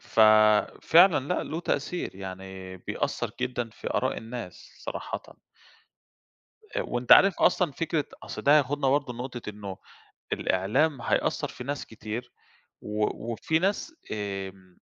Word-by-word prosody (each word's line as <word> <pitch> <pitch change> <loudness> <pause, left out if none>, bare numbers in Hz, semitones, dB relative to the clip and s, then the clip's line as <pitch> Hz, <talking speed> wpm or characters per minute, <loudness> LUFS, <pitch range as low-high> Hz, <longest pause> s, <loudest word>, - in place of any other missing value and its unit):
ففعلًا 110 - +5
لأ، 180 - 0
له 160 - -4
تأثير، 175 - -2
يعني 95 -1 -8
بيأثر - - -3
جدًا 120 -2 -2
في - - -7
آراء - - 0
الناس 115 -5 -8 0.2
صراحةً. - - -4 1.5
آآ - - +1
وأنت 120 0 +2
عارف 195 -3 +7
أصلًا 175 -6 +3
فكرة 160 0 -1 0.2
أصل - - -6
ده 145 +2 +6
هياخدنا 145 -1 +1
برضه 135 -2 +1
لنقطة 120 -2 -6
إنه 100 -2 -7 0.6
الإعلام 125 +9 +1
هيأثر - - 0
في 125 - -9
ناس 145 +1 -4
كتير 110 +2 -6 0.5
و 105 0 -1 0.3
وفي 160 +7 0
ناس، 200 - -1 0.2
آمم، 95 -3 -6
120 Hz, 125 wpm, -27 LUFS, 105-145 Hz, 1.5 s, عارف